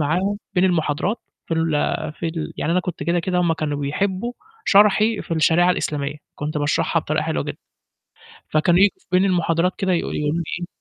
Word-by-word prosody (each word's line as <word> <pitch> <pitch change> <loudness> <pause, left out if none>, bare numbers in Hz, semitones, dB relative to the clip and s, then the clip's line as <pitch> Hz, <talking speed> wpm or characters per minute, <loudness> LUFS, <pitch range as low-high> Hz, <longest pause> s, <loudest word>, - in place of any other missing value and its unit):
معاهم 180 +7 0 0.2
بين 180 0 +3
المحاضرات 175 +3 +1 0.3
في 165 - -1
ال 165 0 0 0.4
في 165 - -5
ال 160 -1 -4
يعني 165 - -1
أنا 180 - +3
كنت 180 -4 -5
كده 170 +4 +1
كده 180 +1 -1
هُم 170 -2 +2
كانوا 150 -2 -2
بيحبّوا 190 +10 -1 0.3
شرحي 210 +2 +4
في 165 - -3
الشريعة 165 +3 +4
الإسلامية، 145 -4 -2 0.2
كنت 150 +1 -3
باشرحها 145 0 +1
بطريقة - - -1
حلوة - - -1
جدًا. - - -5 0.9
فكانوا 170 +3 +3
يي 200 - +7 0.2
بين 185 +1 +4
المحاضرات 175 -1 +2
كده 190 -2 +1
يقو 170 - 0
يقولوا 150 0 -1
لي 170 - 0 0.2
إيه 175 - -4
170 Hz, 185 wpm, -22 LUFS, 155-185 Hz, 0.9 s, يي